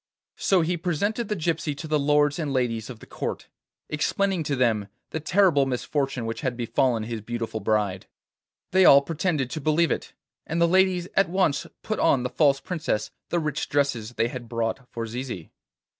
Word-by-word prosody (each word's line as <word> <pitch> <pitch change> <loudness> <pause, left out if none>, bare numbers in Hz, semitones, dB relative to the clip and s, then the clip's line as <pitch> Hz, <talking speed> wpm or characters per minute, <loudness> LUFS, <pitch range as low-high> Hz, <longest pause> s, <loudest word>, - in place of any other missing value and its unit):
So 190 -3 +3
he 175 +2 0
presented 200 +7 -1
the 210 - -1
gypsy 160 -4 -1
to 155 - -6
the 155 -1 +1
lords 145 +1 +3
and 150 -4 -2
ladies 120 -4 -1
of 125 - -7
the - - -11
Court, - - -5 0.4
explaining 185 +4 0
to 145 - 0
them 115 -5 +1 0.2
the 160 - -2
terrible 160 -4 +3
misfortune 135 0 -2
which 115 0 -4
had 125 -2 -2
befallen 120 -1 +1
his 115 0 -4
beautiful 115 0 -4
bride. 105 -4 0 0.6
They 190 +1 +5
all 140 -4 +8
pretended 155 -4 -1
to 155 - -4
believe 155 +3 +2
it, - - -3 0.3
and 165 - -1
the 170 - +5
ladies 185 0 +3
at 195 -3 +3
once 175 -6 +1 0.2
put 215 - -2
on 135 -6 +3
the 125 - -3
false 140 -3 +3
princess 150 - -2 0.2
the 175 - 0
rich 155 -3 -2
dresses 130 -6 0
they 115 - +1
had 120 -2 -7
brought 115 +2 -2
for 115 -1 -4
Zizi. 115 -6 -6
140 Hz, 185 wpm, -25 LUFS, 120-170 Hz, 0.6 s, all